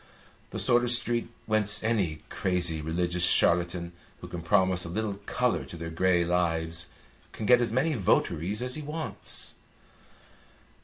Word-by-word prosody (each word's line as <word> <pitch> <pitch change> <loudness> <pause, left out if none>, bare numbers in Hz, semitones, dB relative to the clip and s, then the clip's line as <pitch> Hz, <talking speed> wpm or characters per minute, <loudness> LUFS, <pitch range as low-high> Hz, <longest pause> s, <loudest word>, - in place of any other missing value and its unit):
The - - -6
sort 120 0 +4
of 120 - 0
street 120 -1 +2 0.2
whence 105 -1 +1
any 95 -9 0
crazy 90 -4 0
religious 85 +3 -1
charlatan 85 0 +3 0.3
who - - -9
can 85 - -6
promise 95 0 +2
a 85 - -6
little 105 +2 -3
colour 125 -1 0
to 85 - -10
their 80 0 -6
grey 90 +1 +2
lives 85 -1 -1 0.5
can 110 - -5
get 125 +2 +6
as 120 - 0
many 135 +7 +1
votaries 100 - 0
as 125 0 -3
he 155 - -4
wants. 155 +2 -5
95 Hz, 150 wpm, -28 LUFS, 85-115 Hz, 0.5 s, get